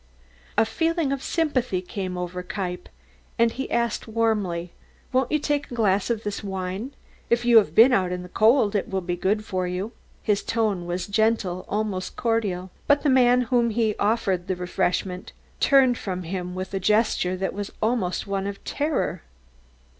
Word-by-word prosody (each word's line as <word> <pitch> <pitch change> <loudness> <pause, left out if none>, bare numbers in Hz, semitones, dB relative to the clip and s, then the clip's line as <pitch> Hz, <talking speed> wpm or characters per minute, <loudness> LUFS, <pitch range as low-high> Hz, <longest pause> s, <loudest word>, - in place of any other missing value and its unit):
A - - +5
feeling 325 +5 0
of 275 -1 -2
sympathy 260 - 0
came 185 0 -5
over 180 0 -4
Kniepp 180 -2 -5 0.5
and 230 -1 +4
he 265 +3 -5
asked 235 -1 -1
warmly: 210 -7 0 0.4
"Won't 260 -1 +2
you 305 - +4
take 290 -1 -1
a 245 - -6
glass 205 -3 +2
of 230 -2 -1
this 205 0 -4
wine? 190 +6 -4 0.3
If 240 0 +2
you 240 -1 +7
have 180 -8 +4
been 240 +4 +7
out 185 -5 +2
in 180 0 -3
the - - -9
cold 220 +1 +4
it 205 - -1
will 190 -1 -1
be 175 0 -2
good 205 +4 0
for 185 -3 -2
you." 185 +5 -3 0.3
His 210 -2 +1
tone 210 -6 -1
was 175 +1 -2
gentle, 205 -4 0
almost 205 -3 -2
cordial, 205 -6 -1 0.2
but 285 0 +4
the 290 - +3
man 250 -1 +5
to - - -2
whom 240 -2 +3
he 220 -1 +1
offered 200 -4 +1
the 185 - 0
refreshment 180 0 -2 0.3
turned 265 -4 +4
from 185 -2 -4
him 180 +1 -4
with 185 +1 -5
a 195 - 0
gesture 210 -2 +2
that 190 +1 -2
was 205 0 -5
almost 215 -5 0
one 195 -1 -2
of 200 0 -6
terror. 275 - -1
205 Hz, 180 wpm, -24 LUFS, 185-235 Hz, 0.5 s, you